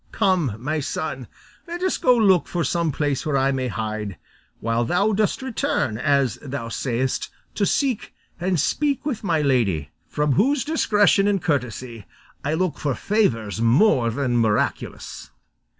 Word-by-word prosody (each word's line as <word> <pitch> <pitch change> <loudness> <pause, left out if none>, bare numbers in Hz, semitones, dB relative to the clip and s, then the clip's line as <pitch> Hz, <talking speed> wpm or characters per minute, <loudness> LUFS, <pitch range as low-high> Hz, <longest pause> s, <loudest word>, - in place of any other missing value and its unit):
Come, 175 - +1
my 150 +7 -2
son, 140 - -4 0.4
let 345 +2 -5
us 375 - 0
go 250 -1 +4
look 190 -6 +4
for 175 -1 -1
some 165 +3 0
place 145 -1 -1
where 150 -4 0
I 135 +1 +2
may 130 -1 -1
hide, 110 -2 -4 0.4
while 115 +1 0
thou 180 - +1
dost 215 +5 0
return, 150 - -1
as 140 -4 +1
thou 135 -4 -5
sayest, 125 +2 -2 0.2
to 200 - 0
seek, 265 -6 0 0.3
and 180 -1 0
speak 285 - 0
with 250 -8 -3
my 165 -5 +1
lady, 105 - +1 0.2
from 150 0 0
whose 260 - +2
discretion 205 -9 +3
and 200 -1 +2
courtesy 125 - -3 0.4
I 150 +3 0
look 180 -1 -1
for 140 -3 -1
favours 115 - 0
more 120 - +4
than 125 0 0
miraculous." 110 -3 -1
145 Hz, 150 wpm, -23 LUFS, 120-200 Hz, 0.4 s, go